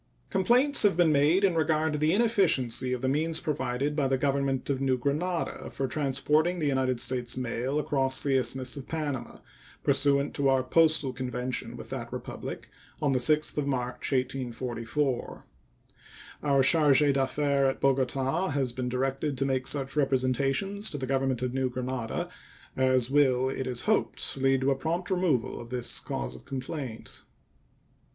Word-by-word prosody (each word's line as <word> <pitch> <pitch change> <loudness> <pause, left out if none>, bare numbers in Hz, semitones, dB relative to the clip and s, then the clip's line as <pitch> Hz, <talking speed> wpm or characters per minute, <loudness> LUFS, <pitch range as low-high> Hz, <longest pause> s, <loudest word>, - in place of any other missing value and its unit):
Complaints 250 +9 +4
have 200 -5 +3
been 170 -3 +4
made 150 +7 +3
in 195 -3 +4
regard 160 -1 +1
to 150 - -2
the 155 +1 +2
inefficiency 180 - +2
of 125 0 -3
the - - +1
means 160 +4 +1
provided 140 -1 -2
by 145 -3 +1
the 135 0 +1
Government 135 -1 0
of 135 -1 -1
New 130 -2 +1
Granada 155 +7 -2
for 135 - -3
transporting 150 +5 +1
the 160 - -2
United 130 -3 0
States 125 -1 -1
mail 125 +2 -2
across 135 -3 +1
the 140 -2 +1
Isthmus 130 0 -1
of 140 -2 -8
Panama, 145 -7 -4 0.5
pursuant 140 0 +2
to 140 -1 +1
our 135 -1 +3
postal 155 -1 +3
convention 125 0 -4
with - - -10
that - - -5
Republic - - -7 0.3
of 145 -3 +1
the 130 - +2
6th 150 +4 +2
of 140 - -2
March, 125 -1 -2
1844. 125 0 -2 1.0
Our 140 -2 +3
charge 150 -1 +5
d'affaires 140 0 +1
at 135 - -4
Bogota 135 +5 +1
has 135 -3 -1
been 125 0 -3
directed 135 +2 -2
to 135 - 0
make 130 -1 -1
such 135 -1 -2
representations 135 - +1
to 145 - -4
the 135 - -3
Government 135 -1 0
of 125 -1 -2
New 130 -1 0
Granada 125 -2 -3 0.5
as 130 -1 +2
will, 130 -3 +3
it 135 0 -4
is 125 -2 -2
hoped, - - 0
lead 135 0 +2
to 135 +1 +2
a - - +2
prompt 170 +7 -3
removal 175 -13 0
of 120 - -11
this 125 -1 -1
cause 65 0 -4
of 65 - -14
complaint. 130 -3 -6
135 Hz, 165 wpm, -28 LUFS, 130-150 Hz, 1.0 s, charge